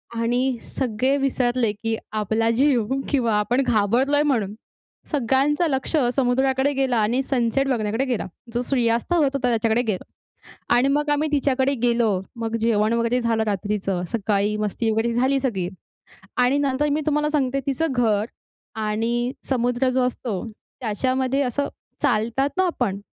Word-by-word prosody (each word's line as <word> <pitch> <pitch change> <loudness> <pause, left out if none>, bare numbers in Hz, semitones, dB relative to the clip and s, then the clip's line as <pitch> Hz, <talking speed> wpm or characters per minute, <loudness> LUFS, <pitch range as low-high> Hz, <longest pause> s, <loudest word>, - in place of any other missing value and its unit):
आणि 245 +2 0
सगळे 255 +1 -1
विसरले 250 -4 +1
की 225 +2 -3 0.2
आपला 220 +2 +1
जीव 250 -1 +2 0.2
किंवा 245 -6 +1
आपण 245 +5 +1
घाबरलोय 245 +7 +2
म्हणून. 225 -9 0 0.6
सगळ्यांचं 290 +4 +2
लक्ष 270 +3 -1 0.2
समुद्राकडे 265 +1 +2
गेला 265 -3 +1
आणि 225 +4 +2
सनसेट 265 0 0
बघण्याकडे 230 0 0
गेला. 245 -4 -2 0.3
जो 240 - 0
सूर्यास्त 240 +2 0
होत 340 -3 +4
होता, 270 -2 0
त्याच्याकडे 225 0 +2
गेला. 215 -6 -2 0.7
आणि 245 +3 +4
मग 295 +1 +1
आम्ही 295 +1 +1
तिच्याकडे 275 -1 +2
गेलो, 235 -2 +3 0.3
मग 225 0 -2
जेवण 220 -1 +2
वगैरे 235 +1 +1
झालं 230 -2 +1
रात्रीचं, 200 -2 -1
सकाळी 210 -1 0
मस्ती 215 +2 -1
वगैरे 225 +2 0
झाली 265 +3 +2
सगळी. 195 -9 -1 0.7
आणि 250 +3 +3
नंतर 285 +1 +1
मी 300 - +1
तुम्हाला 300 0 +1
सांगते, 275 -2 0
तिचं 280 +2 0
घर 220 -4 +2 0.6
आणि 230 +3 -1 0.2
समुद्र 245 0 +1
जो 255 0 +1
असतो, 230 -5 -4 0.4
त्याच्यामध्ये 260 +4 0
असं 280 +2 -1 0.3
चालतात 235 +6 +1
ना 375 - +3
आपण, 200 - -1
245 Hz, 145 wpm, -23 LUFS, 225-270 Hz, 0.7 s, होत